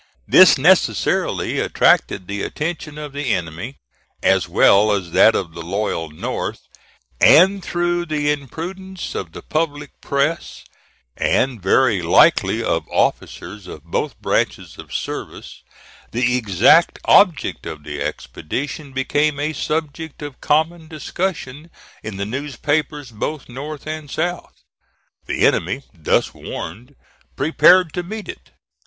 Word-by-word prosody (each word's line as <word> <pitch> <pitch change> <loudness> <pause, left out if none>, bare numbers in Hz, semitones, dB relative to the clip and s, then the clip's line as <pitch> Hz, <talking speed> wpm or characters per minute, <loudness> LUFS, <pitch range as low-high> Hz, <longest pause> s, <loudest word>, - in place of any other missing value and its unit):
This - - +7
necessarily - - +2
attracted 95 - +2
the 100 0 -4
attention 155 +1 -4
of 150 -2 -7
the 140 -4 -2
enemy, 90 - -6 0.5
as 95 -2 +2
well 100 +4 +5
as 95 -4 -3
that 110 - +5
of 85 -4 -3
the 85 - -8
loyal 85 -2 -3
North; 75 - -4 0.6
and 190 +3 +6
through 175 0 -1
the 150 -1 0
imprudence 175 +7 -6
of 85 -4 -5
the - - -10
public 150 -2 -2
press, 140 +4 -2 0.5
and 125 -5 0
very 105 +1 +3
likely 85 0 +4
of - - -1
officers 105 -3 -2
of 75 - -10
both 85 - -3
branches - - -2
of - - -11
service, - - -6 0.5
the 125 +1 +1
exact 105 -8 +4
object - - +3
of 75 -2 -7
the 75 0 -6
expedition 135 - -5
became 145 +2 0
a 150 +2 -1
subject 155 0 -4
of 145 -2 -9
common 160 +2 0
discussion 155 -1 -4 0.3
in 110 -3 -7
the 100 - -2
newspapers 145 +3 -2
both 140 +7 -5
North 145 +4 -8
and 155 -1 -6
South. 175 +4 -3 0.7
The - - +1
enemy, 95 +11 +1
thus 80 -5 0
warned, 120 +12 -8 0.4
prepared 175 +1 +4
to 180 - -2
meet 210 +4 -7
it. - - -10
140 Hz, 125 wpm, -20 LUFS, 100-155 Hz, 0.7 s, This